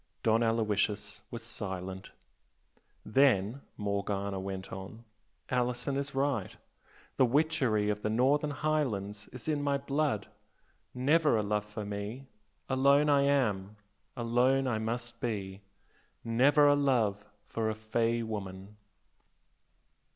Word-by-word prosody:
Don 115 Hz, 0 st, +3 dB
Aloysius 110 Hz, -3 st, 0 dB
was 115 Hz, -1 st, -7 dB
silent. 95 Hz, -4 st, -5 dB, 1.0 s
"Then" 120 Hz, -1 st, +3 dB, 0.2 s
Morgana 100 Hz, -1 st, -2 dB
went 95 Hz, 0 st, -5 dB
on 95 Hz, +4 st, -8 dB, 0.5 s
"Alison 125 Hz, +2 st, 0 dB
is 140 Hz, 0 st, -3 dB
right. 135 Hz, -8 st, -1 dB, 0.6 s
The 130 Hz, -, +6 dB
witchery 125 Hz, -6 st, +2 dB
of 105 Hz, 0 st, -4 dB
the 105 Hz, -, -1 dB
Northern 135 Hz, +7 st, +2 dB
Highlands 120 Hz, -10 st, -1 dB
is 125 Hz, +1 st, -10 dB
in 150 Hz, -2 st, 0 dB
my 140 Hz, -1 st, +1 dB
blood, 140 Hz, -5 st, -1 dB, 0.7 s
never 145 Hz, +1 st, +3 dB
a 105 Hz, -, +1 dB
love 105 Hz, 0 st, -1 dB
for 105 Hz, 0 st, -6 dB
me 105 Hz, +6 st, -5 dB, 0.4 s
alone 140 Hz, +3 st, +4 dB
I 140 Hz, -1 st, +5 dB
am 105 Hz, -8 st, +1 dB, 0.4 s
alone 125 Hz, +3 st, +2 dB
I 110 Hz, -4 st, 0 dB
must 120 Hz, +2 st, -3 dB
be! 100 Hz, -5 st, -3 dB, 0.6 s
never 135 Hz, +6 st, +4 dB
a 145 Hz, -, +7 dB
love 120 Hz, -8 st, +1 dB, 0.2 s
for 110 Hz, -1 st, -2 dB
a 110 Hz, -, -2 dB
'fey' 115 Hz, +2 st, 0 dB
woman!" 100 Hz, -2 st, -6 dB
115 Hz, 120 wpm, -31 LUFS, 105-135 Hz, 1.0 s, a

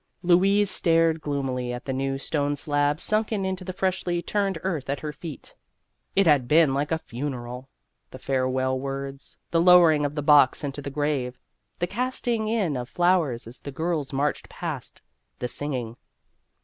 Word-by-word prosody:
Louise 195 Hz, +3 st, +4 dB
stared 165 Hz, -2 st, +3 dB
gloom 140 Hz, -3 st, -2 dB
ily 125 Hz, -1 st, -2 dB
at 120 Hz, +1 st, -6 dB
the 135 Hz, -, -2 dB
new 135 Hz, +1 st, -1 dB
stone 145 Hz, +1 st, -1 dB
slab 145 Hz, 0 st, 0 dB
sunken 215 Hz, -1 st, 0 dB
into 190 Hz, 0 st, -3 dB
the 185 Hz, -, -4 dB
freshly 185 Hz, -2 st, -1 dB
turned 195 Hz, 0 st, -1 dB
earth 160 Hz, -8 st, -2 dB
at 140 Hz, -, -2 dB
her 150 Hz, -1 st, -4 dB
feet. 150 Hz, 0 st, -9 dB, 0.6 s
It 195 Hz, -, +4 dB
had 145 Hz, -6 st, +4 dB
been 155 Hz, -1 st, +5 dB
like 145 Hz, +3 st, -1 dB
a 160 Hz, -, +2 dB
funeral 125 Hz, -2 st, -6 dB, 0.4 s
the -, -, -10 dB
farewell 130 Hz, 0 st, 0 dB
words, 135 Hz, 0 st, -6 dB
the 165 Hz, -, +3 dB
lowering 170 Hz, -4 st, +6 dB
of 145 Hz, 0 st, -2 dB
the 150 Hz, -, -2 dB
box 145 Hz, -2 st, +5 dB
into 145 Hz, 0 st, -4 dB
the 140 Hz, -, -5 dB
grave, 140 Hz, -3 st, -1 dB, 0.4 s
the 175 Hz, -, 0 dB
casting 235 Hz, +2 st, -2 dB
in 210 Hz, -9 st, 0 dB
of 125 Hz, -1 st, -4 dB
flowers 175 Hz, -9 st, +1 dB
as 115 Hz, +3 st, -11 dB
the 140 Hz, -, -7 dB
girls 160 Hz, 0 st, -2 dB
marched 145 Hz, +2 st, -1 dB
past, -, -, -6 dB, 0.3 s
the 125 Hz, -, -3 dB
singing. 125 Hz, -4 st, -4 dB
145 Hz, 170 wpm, -25 LUFS, 135-175 Hz, 0.6 s, lowering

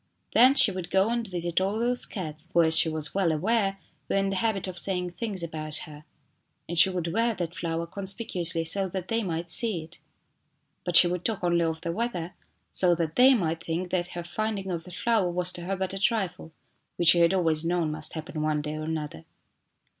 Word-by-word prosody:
Then 255 Hz, +4 st, +6 dB
she 225 Hz, -, +4 dB
would 185 Hz, -2 st, -6 dB
go 190 Hz, +3 st, +2 dB
and 235 Hz, -1 st, -2 dB
visit 175 Hz, -1 st, -1 dB
all 195 Hz, +3 st, -1 dB
those 245 Hz, +2 st, +2 dB
cats, 160 Hz, -4 st, -7 dB
who, 170 Hz, -, +6 dB
as 160 Hz, 0 st, +5 dB
she 160 Hz, -, +7 dB
was 155 Hz, -2 st, -4 dB
well 190 Hz, -4 st, +1 dB
aware, 195 Hz, +4 st, 0 dB, 0.3 s
were -, -, 0 dB
in 195 Hz, 0 st, +1 dB
the 195 Hz, -, -2 dB
habit 215 Hz, -3 st, -1 dB
of 180 Hz, -2 st, -5 dB
saying 180 Hz, -2 st, 0 dB
things 190 Hz, 0 st, -4 dB
about 155 Hz, -2 st, -6 dB
her, 150 Hz, 0 st, -13 dB, 0.6 s
and 170 Hz, -, -4 dB
she 175 Hz, -, +9 dB
would 175 Hz, -3 st, -3 dB
wear 230 Hz, +1 st, +1 dB
that 170 Hz, -3 st, -4 dB
flower 165 Hz, -1 st, -3 dB
conspicuously 185 Hz, -3 st, -2 dB
so 190 Hz, +4 st, +2 dB
that 185 Hz, 0 st, -6 dB
they 230 Hz, 0 st, +1 dB
might 170 Hz, -3 st, -3 dB
see 215 Hz, -6 st, +2 dB
it. 160 Hz, +3 st, -13 dB, 0.9 s
But 175 Hz, -, -2 dB
she -, -, +8 dB
would 180 Hz, 0 st, -3 dB
talk 220 Hz, -5 st, -3 dB
only 170 Hz, -1 st, +2 dB
of 160 Hz, 0 st, -3 dB
the 170 Hz, -, -3 dB
weather 180 Hz, -4 st, -3 dB, 0.4 s
so 180 Hz, -2 st, +3 dB
that 165 Hz, -2 st, -3 dB
they 260 Hz, +2 st, +7 dB
mignt 165 Hz, -6 st, -1 dB
think 175 Hz, +2 st, -4 dB
that 175 Hz, -2 st, 0 dB
her 175 Hz, -, -4 dB
finding 195 Hz, +2 st, -3 dB
of 165 Hz, -2 st, -4 dB
the 180 Hz, -, -11 dB
flower 215 Hz, 0 st, 0 dB
was 180 Hz, +1 st, -1 dB
to 175 Hz, -, -8 dB
her 195 Hz, +2 st, -2 dB
bu 190 Hz, -, -3 dB
a 190 Hz, +1 st, -4 dB
trifle 205 Hz, -7 st, -1 dB, 0.4 s
which 170 Hz, -1 st, +4 dB
she 175 Hz, -, +7 dB
had 170 Hz, +2 st, +4 dB
always 165 Hz, -4 st, +2 dB
known 170 Hz, -2 st, 0 dB
must 155 Hz, 0 st, -2 dB
happen 160 Hz, 0 st, -6 dB
one 155 Hz, -1 st, 0 dB
day 150 Hz, +1 st, -4 dB
or 155 Hz, -, -5 dB
another. 150 Hz, -, -5 dB
175 Hz, 220 wpm, -26 LUFS, 165-195 Hz, 0.9 s, she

